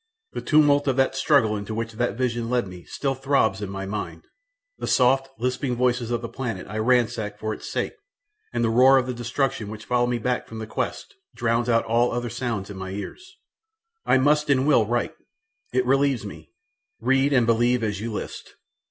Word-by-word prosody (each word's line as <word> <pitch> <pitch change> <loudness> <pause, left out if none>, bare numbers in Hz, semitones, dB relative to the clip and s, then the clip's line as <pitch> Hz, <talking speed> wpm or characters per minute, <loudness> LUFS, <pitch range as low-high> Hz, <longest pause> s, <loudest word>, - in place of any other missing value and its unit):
The - - -5
tumult 145 -2 +4
of 135 - +2
the 135 0 +3
struggle 135 -5 +3
into 105 +1 -5
which 115 0 -3
that 120 +1 -1
vision 120 -2 -1
led 125 -4 +1
me 90 -1 -11
still 135 -2 -2
throbs 135 -7 +1
in 100 - -4
my 95 0 -5
mind, 100 +1 -5 0.6
the - - -4
soft, 135 +1 +3
lisping 125 +2 -1
voices 125 -1 +1
of 120 0 -2
the - - -3
planet 115 -7 -5
I 105 +3 -4
ransacked 110 -3 +1
for 110 0 -2
its - - -8
sake - - -2 0.6
and 120 - -1
the 115 - +2
roar 130 +3 +6
of 130 - +2
the 125 - -3
destruction 120 -2 -2
which 110 0 -8
followed 120 -1 +1
me 120 0 0
back 125 +2 -2
from 115 - -9
the 110 - -5
quest 110 - -4 0.2
drowns 115 +1 0
all 115 +1 +2
other 120 -1 -3
sounds 115 -5 -3
in 100 - -8
my 95 0 -5
ears! 365 - -8 0.7
I - - +4
must 150 +3 +2
and 135 -1 +3
will 130 -8 +4
write 120 +1 -1 0.6
it 130 0 +1
relieves 135 -3 +2
me; 100 - -10 0.5
read 135 +2 +2
and 125 -4 +4
believe 120 +1 +2
as 105 -2 -2
you 115 +1 -3
list. 105 - -7
120 Hz, 195 wpm, -24 LUFS, 110-130 Hz, 0.7 s, roar